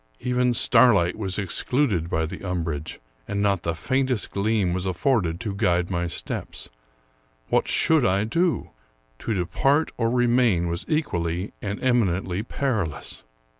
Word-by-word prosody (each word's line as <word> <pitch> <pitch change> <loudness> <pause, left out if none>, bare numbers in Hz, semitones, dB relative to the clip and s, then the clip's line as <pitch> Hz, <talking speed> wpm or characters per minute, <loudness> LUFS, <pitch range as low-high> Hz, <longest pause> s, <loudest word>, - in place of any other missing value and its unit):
Even 125 -1 +1
starlight 115 -8 +5
was 95 -4 -3
ex 95 -4 -3
cluded 110 - 0
by 80 -1 0
the 80 - -8
umbrage, 80 -5 -4 0.3
and 100 - -2
not 100 -3 +1
the 85 -1 -2
faintest 130 +5 -1
gleam 100 -3 0
was 90 +1 -2
af 90 -2 -3
forded 90 -8 +1
to 105 -2 -4
guide 90 -3 +1
my 85 -1 -1
steps. - - -5 0.8
What - - +2
should 160 -4 +3
I 95 0 +2
do? 165 +10 0 0.5
To 110 - -2
depart 135 - +1
or 115 -1 +1
remain 120 -7 +2
was 85 +2 -4
equally 90 - -1
and 100 0 -4
eminently 95 -7 +1
perilous. 110 - -3
100 Hz, 145 wpm, -24 LUFS, 85-125 Hz, 0.8 s, starlight